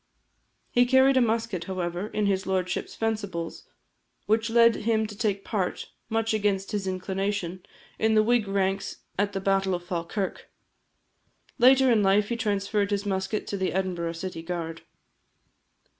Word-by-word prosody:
He 245 0 +4
carried 265 +1 +5
a 260 - +5
musket, 225 -6 0
however, 180 0 -3
in 215 -1 -1
his 195 -1 0
lordship's 185 -1 -2
fencibles; 200 -7 -3 0.6
which 220 +2 +1
led 230 0 +5
him 220 0 +1
to 210 -1 -8
take 200 -2 -1
part, 195 -5 -2 0.2
much 225 0 0
against 200 -2 0
his 205 -2 -2
inclination, 190 -1 -2 0.4
in 220 0 +3
the 215 - +5
Whig 235 -1 +2
ranks 195 0 -1 0.2
at 205 0 +1
the 195 - -1
battle 195 -1 +1
of 175 0 -7
Falkirk. 180 +3 -3 1.1
Later 260 +1 +6
in 225 -3 +4
life 200 +1 +3
he 235 - 0
transferred 205 -2 0
his 205 0 -1
musket 190 +1 -2
to 200 - -3
the 190 -1 -1
Edinburgh 175 -3 -1
City 165 0 -5
Guard. 165 -1 -5
200 Hz, 150 wpm, -26 LUFS, 190-220 Hz, 1.1 s, Later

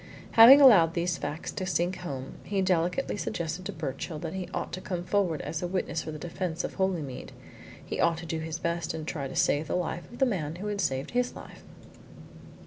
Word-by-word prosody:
Having 250 +5 +10
allowed 185 - +7
these 175 0 0
facts 155 +2 -4
to 190 - -4
sink 180 0 0
home, 135 -6 -6
he 200 -1 -2
delicately 180 +7 +1
suggested 175 -3 -3
to - - -3
Birchill 155 +1 -5
that 160 +1 -5
he 190 -1 -5
ought - - -4
to 185 - -4
come 180 -3 -4
forward 180 -4 0
as 160 - -4
a 175 - -1
witness 180 -3 -2
for 155 - -6
the 155 - -6
defence 170 +1 -4
of - - -4
Holymead 175 -9 -2 0.5
he - - -5
ought 165 -1 +3
to 170 - -7
do 160 -1 -3
his 160 0 -4
best 170 -1 -2
to 160 - -4
try 150 -2 -4
and 135 - -6
save 150 +2 +2
the - - -1
life 175 +1 -3
of 240 - -10
the 265 - +4
man 165 - -2
who 185 +4 -7
had 205 -1 -2
saved 135 -4 -1
his 245 0 0
life. - - -11
170 Hz, 220 wpm, -28 LUFS, 160-190 Hz, 0.5 s, Having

